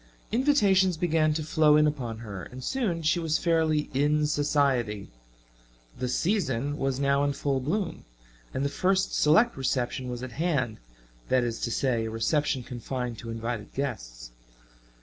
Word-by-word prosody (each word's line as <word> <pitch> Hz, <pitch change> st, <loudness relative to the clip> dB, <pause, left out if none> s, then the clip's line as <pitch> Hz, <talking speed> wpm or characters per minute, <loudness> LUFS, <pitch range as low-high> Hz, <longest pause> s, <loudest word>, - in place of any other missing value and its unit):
Invitations 205 Hz, -, +3 dB
began 160 Hz, -2 st, +2 dB
to 155 Hz, -, -1 dB
flow 150 Hz, -1 st, +4 dB
in 150 Hz, -, +5 dB
upon 125 Hz, -7 st, -2 dB
her 100 Hz, -3 st, -6 dB
and 130 Hz, +6 st, -9 dB
soon 200 Hz, -, -1 dB
she 160 Hz, +3 st, +2 dB
was 160 Hz, -2 st, +1 dB
fairly 160 Hz, -3 st, +1 dB
"in 150 Hz, +3 st, +2 dB
society." 140 Hz, -8 st, 0 dB, 0.9 s
"The 125 Hz, -, -1 dB
season" 145 Hz, -, 0 dB
was 135 Hz, -1 st, -1 dB
now 140 Hz, 0 st, +2 dB
in 145 Hz, 0 st, +1 dB
full 140 Hz, -1 st, -1 dB
bloom, 170 Hz, +8 st, -2 dB, 0.5 s
and 135 Hz, -, -2 dB
the -, -, +1 dB
first 190 Hz, +5 st, +1 dB
select 165 Hz, +11 st, +4 dB
reception 130 Hz, -1 st, -1 dB
was 125 Hz, 0 st, -5 dB
at 130 Hz, -, -6 dB
hand 135 Hz, -7 st, -1 dB, 0.5 s
that 130 Hz, -1 st, +3 dB
is 115 Hz, -1 st, -2 dB
to 120 Hz, -, -2 dB
say, 120 Hz, -3 st, 0 dB
a -, -, -3 dB
reception 130 Hz, +4 st, 0 dB
confined 125 Hz, -1 st, -5 dB
to 115 Hz, -, -8 dB
invited 115 Hz, -1 st, -5 dB
guests. -, -, -5 dB
140 Hz, 155 wpm, -27 LUFS, 125-160 Hz, 0.9 s, in